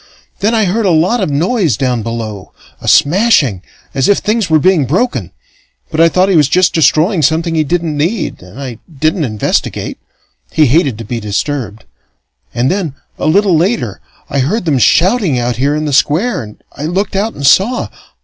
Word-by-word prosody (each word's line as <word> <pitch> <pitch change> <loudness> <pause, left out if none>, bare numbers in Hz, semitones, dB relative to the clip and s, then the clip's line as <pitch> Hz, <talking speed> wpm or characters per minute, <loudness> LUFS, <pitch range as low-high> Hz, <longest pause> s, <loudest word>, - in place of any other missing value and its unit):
Then 215 +4 +1
I 220 -2 +2
heard 205 +3 0
a - - +3
lot 180 +8 +2
of 190 - -1
noise 165 - 0
down 125 -3 -1
below 110 -3 -6 0.3
a - - -8
smashing 150 - +3 0.3
as 135 +4 +1
if 205 - +4
things 215 -4 -1
were 160 - +4
being 165 -2 +2
broken. 150 - -1 0.6
But 155 - +1
I 165 - +6
thought 185 +3 +2
he 195 - +2
was 150 -4 +4
just 185 +2 +2
destroying 160 - +2
something 165 +3 +1
he 160 -1 +1
didn't 165 0 -2
need, 170 +8 -2
and 90 +8 -13
I 130 -5 -7
didn't 155 +2 0
investigate: 110 -4 -2 0.5
he 155 - +3
hated 135 -3 +2
to 115 - -8
be 120 +2 -4
disturbed. 110 +1 -3 0.7
And 125 +2 0
then, 180 -8 -2 0.2
a - - -1
little 190 +2 +3
later, 165 - -1 0.3
I 140 - -2
heard 175 - -1
them 145 -5 +1
shouting 180 - +3
out 120 0 -1
here 140 +3 +1
in 155 0 -2
the 145 - -2
Square, 155 - +1
and 105 - -15
I 145 - -5
looked 190 +5 -2
out 210 +3 -1
and 140 - -4
saw. 205 - +3
155 Hz, 190 wpm, -13 LUFS, 130-190 Hz, 0.7 s, I